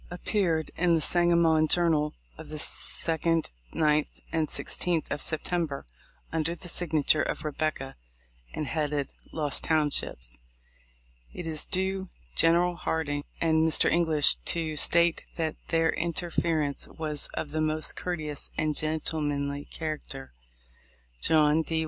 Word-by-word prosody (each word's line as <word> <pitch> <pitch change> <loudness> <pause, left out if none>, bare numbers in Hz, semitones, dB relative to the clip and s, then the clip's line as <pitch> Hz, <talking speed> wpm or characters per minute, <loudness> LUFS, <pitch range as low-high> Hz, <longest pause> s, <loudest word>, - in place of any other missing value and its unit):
appeared 175 -3 0
in 175 -1 +3
the - - +2
Sangamon 170 -1 +4
Journal, 155 -3 +2 0.2
of - - -10
the 155 - -5
2d, 165 +1 0 0.2
9th, 150 -1 +2
and 160 -2 +1
16th 170 0 0
of 145 - -1
September, 160 -2 -1 0.5
under 165 +1 0
the 175 - -7
signature 155 -3 +2
of - - -3
"Rebecca," 150 -2 -2 0.6
and 155 - -3
headed 150 -2 -1 0.2
"Lost 150 -3 -1
Townships." 145 - 0 0.9
It 175 - -7
is 155 -2 -2
due 190 +1 -1 0.3
General 175 +1 +3
Hardin 160 -4 -1 0.2
and 160 -1 +2
Mr. 160 -1 +3
English 160 -3 +5
to 160 -2 0
state 170 +3 +3
that 160 -2 -1
their 165 -1 +2
interference 165 -3 -1
was 155 -2 -3
of 150 - -4
the 155 +1 -1
most 155 0 +1
courteous 155 -5 -4
and 155 -1 0
gentlemanly 145 -2 -1
character. 155 -4 -6 0.9
John 155 0 +4
D. 160 0 -1
160 Hz, 125 wpm, -28 LUFS, 150-170 Hz, 0.9 s, English